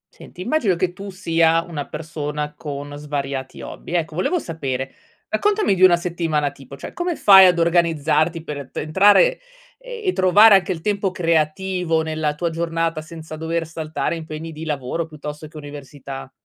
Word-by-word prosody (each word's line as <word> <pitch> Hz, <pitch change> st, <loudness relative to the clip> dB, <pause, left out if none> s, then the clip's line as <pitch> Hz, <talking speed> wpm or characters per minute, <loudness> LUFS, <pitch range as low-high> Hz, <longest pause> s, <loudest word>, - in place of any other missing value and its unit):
Senti, 180 Hz, -, -12 dB
immagino 225 Hz, -, +1 dB
che 175 Hz, +1 st, -1 dB
tu 200 Hz, +3 st, -8 dB
sia 165 Hz, -3 st, +2 dB
una 155 Hz, -5 st, -6 dB
persona 150 Hz, -1 st, -4 dB
con 145 Hz, -1 st, -6 dB
svariati 140 Hz, -2 st, -5 dB
hobby. -, -, -8 dB
Ecco 165 Hz, -2 st, -1 dB
volevo 185 Hz, -, 0 dB
sapere, 135 Hz, -, -4 dB, 0.3 s
raccontami 420 Hz, -, +1 dB
di 185 Hz, -, -3 dB
una 185 Hz, -2 st, +8 dB
settimana 165 Hz, -4 st, -1 dB
tipo. 140 Hz, 0 st, -13 dB
Cioè -, -, -8 dB
come 350 Hz, -1 st, -2 dB
fai 190 Hz, -6 st, +8 dB
ad 180 Hz, -1 st, +3 dB
organizzarti 165 Hz, -1 st, +2 dB
per 145 Hz, -4 st, -7 dB
pe -, -, -5 dB
entrare 205 Hz, -, +4 dB, 0.4 s
e 480 Hz, -6 st, -3 dB
trovare 205 Hz, +4 st, +6 dB
anche 190 Hz, -1 st, +4 dB
il 165 Hz, -3 st, -4 dB
tempo 200 Hz, 0 st, 0 dB
creativo 170 Hz, 0 st, 0 dB
nella 155 Hz, -1 st, -2 dB
tua 170 Hz, +2 st, -2 dB
giornata 165 Hz, -1 st, -1 dB
senza 160 Hz, 0 st, -9 dB
dover 165 Hz, +1 st, -2 dB
saltare 155 Hz, -2 st, -3 dB
impegni 160 Hz, 0 st, -7 dB
di 160 Hz, +1 st, -8 dB
lavoro, 150 Hz, +2 st, -3 dB
piuttosto 150 Hz, 0 st, -8 dB
che 155 Hz, -, -13 dB
università? 140 Hz, -2 st, -9 dB
165 Hz, 160 wpm, -21 LUFS, 150-180 Hz, 0.4 s, una